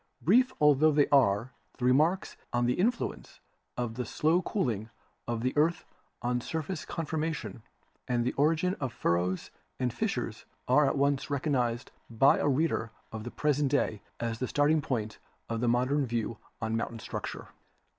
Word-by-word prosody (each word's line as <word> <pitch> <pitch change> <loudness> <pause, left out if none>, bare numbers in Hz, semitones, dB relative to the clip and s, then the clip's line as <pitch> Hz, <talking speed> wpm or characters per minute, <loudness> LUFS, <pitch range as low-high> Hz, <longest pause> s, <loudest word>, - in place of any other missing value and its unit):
Brief 250 - +4
altho 150 +1 +5
they 145 -1 +4
are, 120 -3 +3 0.3
the 125 - -2
remarks 155 +9 +2 0.2
on 120 0 +1
the 125 - +2
influence 230 - -1 0.4
of 120 -2 -2
the 125 +2 -3
slow 160 +9 +2
cooling 120 - -2 0.4
of 120 -1 -2
the 130 - 0
earth 160 +3 +2 0.4
on 125 0 0
surface 160 +5 -4
conformation 160 -5 -3 0.5
and 120 -1 +1
the 125 - 0
origin 160 +5 +2
of 130 -3 -2
furrows 90 0 -1 0.3
and 125 -2 0
fissures 120 - -3 0.2
are 140 +3 +5
at 135 - 0
once 140 0 +1
recognised 130 -4 0 0.2
by 120 +4 +4
a - - +1
reader 140 -5 +1 0.2
of 110 -1 -6
the 120 - -5
present 145 +1 +1
day 110 -7 0 0.2
as 115 -1 -2
the 130 - -1
starting 150 +3 +3
point 110 -6 -3 0.3
of 115 0 -3
the 120 - +1
modern 130 +4 +2
views 115 0 -2 0.3
on 110 0 0
moun 115 - 0
tain - - -10
structure. - - -6
130 Hz, 165 wpm, -30 LUFS, 120-150 Hz, 0.5 s, altho